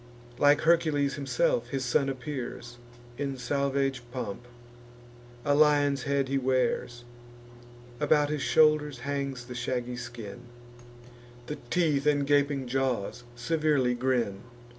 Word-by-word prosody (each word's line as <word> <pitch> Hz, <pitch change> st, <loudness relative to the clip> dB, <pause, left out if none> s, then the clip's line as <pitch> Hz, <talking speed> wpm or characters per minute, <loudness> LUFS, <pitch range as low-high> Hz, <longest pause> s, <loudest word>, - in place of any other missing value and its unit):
Like 145 Hz, +1 st, +5 dB
Hercules 155 Hz, -4 st, +2 dB
himself 125 Hz, -3 st, 0 dB
his 130 Hz, 0 st, -2 dB
son 135 Hz, +3 st, +2 dB
appears, 125 Hz, -3 st, -6 dB, 0.4 s
In 140 Hz, -2 st, -2 dB
salvage 135 Hz, 0 st, -1 dB
pomp; 120 Hz, -2 st, -5 dB, 1.0 s
a 145 Hz, -, +3 dB
lion's 145 Hz, -2 st, +3 dB
hide 140 Hz, -1 st, +1 dB
he 135 Hz, +1 st, 0 dB
wears; 125 Hz, -2 st, 0 dB, 1.0 s
About 150 Hz, 0 st, +3 dB
his 150 Hz, -2 st, -2 dB
shoulders 150 Hz, -4 st, +3 dB
hangs 140 Hz, -2 st, -3 dB
the 125 Hz, -, -8 dB
shaggy 125 Hz, 0 st, -3 dB
skin; 120 Hz, -3 st, -8 dB, 1.1 s
The 150 Hz, +4 st, -5 dB
teeth 150 Hz, -2 st, +1 dB
and 145 Hz, -1 st, +3 dB
gaping 140 Hz, -1 st, +2 dB
jaws 125 Hz, -3 st, -1 dB
severely 145 Hz, -1 st, +1 dB
grin. 120 Hz, -5 st, 0 dB
135 Hz, 115 wpm, -28 LUFS, 125-145 Hz, 1.1 s, Like